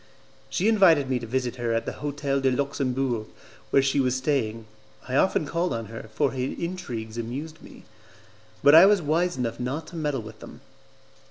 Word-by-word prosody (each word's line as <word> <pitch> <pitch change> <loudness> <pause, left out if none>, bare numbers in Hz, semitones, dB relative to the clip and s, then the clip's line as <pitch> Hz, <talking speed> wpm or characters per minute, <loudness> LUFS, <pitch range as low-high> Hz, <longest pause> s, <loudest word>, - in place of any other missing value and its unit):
She 190 - 0
invited 170 -11 +4
me 125 - +1
to 120 - -7
visit 125 +1 -2
her 120 -1 -1
at 115 - -1
the - - -3
Hotel 140 -1 -1
de 135 - +3
Luxembourg, 130 -3 -1 0.4
where 135 - +4
she 135 +1 +1
was 130 -2 +1
staying. 130 -5 -1 0.4
I 130 - -2
often 160 0 +2
called 170 +3 -1
on 115 -1 -4
her, 115 -1 -8
for - - +2
her 130 - -6
intrigues 125 -6 -4
amused 140 +8 -6
me, - - -14 0.8
but 145 - +7
I 165 +4 +10
was 205 -1 +4
wise 170 +1 0
enough 120 -2 -3
not 135 +6 -3
to 175 - -12
meddle 145 -7 -2
with 110 0 -11
them. - - -12
135 Hz, 185 wpm, -25 LUFS, 120-155 Hz, 0.8 s, I